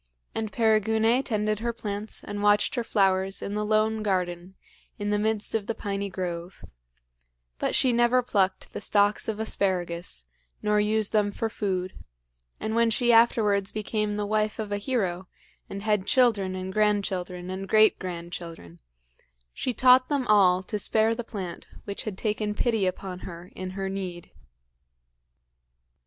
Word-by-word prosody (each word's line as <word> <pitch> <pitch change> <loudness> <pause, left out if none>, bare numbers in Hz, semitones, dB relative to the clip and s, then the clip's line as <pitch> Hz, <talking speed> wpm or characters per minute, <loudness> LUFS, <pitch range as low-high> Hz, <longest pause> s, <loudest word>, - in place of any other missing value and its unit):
And 220 -1 -3
Perigune 220 +2 +3
tended 215 -4 -1
her 235 +1 -1
plants 215 -2 -5
and 205 0 -5
watched 205 0 +3
her 240 - -1
flowers 195 -3 +1
in 200 - -4
the 210 0 -1
lone 215 +1 +1
garden 180 -2 -2 0.4
in 205 0 -2
the 210 - +2
midst 215 0 0
of 215 -2 -1
the 230 - -2
piny 200 -1 -3
grove; 180 -1 -5 0.9
but - - 0
she 255 -2 +3
never 240 +1 +3
plucked 195 -5 0
the - - -5
stalks 205 0 +2
of 220 -1 -3
asparagus 175 - -2 0.3
nor 210 0 +1
used 215 0 +1
them 210 -1 +2
for 225 +2 -2
food, 185 -3 -2 0.7
and 220 - -3
when 230 0 +3
she 240 +1 +3
afterwards 210 -4 +4
became 210 -1 -2
the 210 0 -2
wife 215 0 0
of 215 -2 -4
a 205 - -1
hero 190 -6 -2 0.4
and 200 0 -6
had 210 -3 +1
children 210 -8 +3
and 185 0 -5
grandchildren 190 -4 0
and 190 +1 -5
great 215 0 +5
grandchildren, 170 - -7 0.7
she 255 - -2
taught 255 +2 +5
them 280 -3 0
all 190 -4 +4
to 210 +3 -3
spare 220 +2 +2
the 240 +1 -4
plant 190 -7 -6 0.2
which 200 -1 -5
had 210 -4 -4
taken 210 -1 -1
pity 225 -5 +1
upon 185 0 -4
her 175 0 -9
in 185 0 -5
her 195 0 -2
need. 185 -3 -5
205 Hz, 155 wpm, -26 LUFS, 190-220 Hz, 0.9 s, great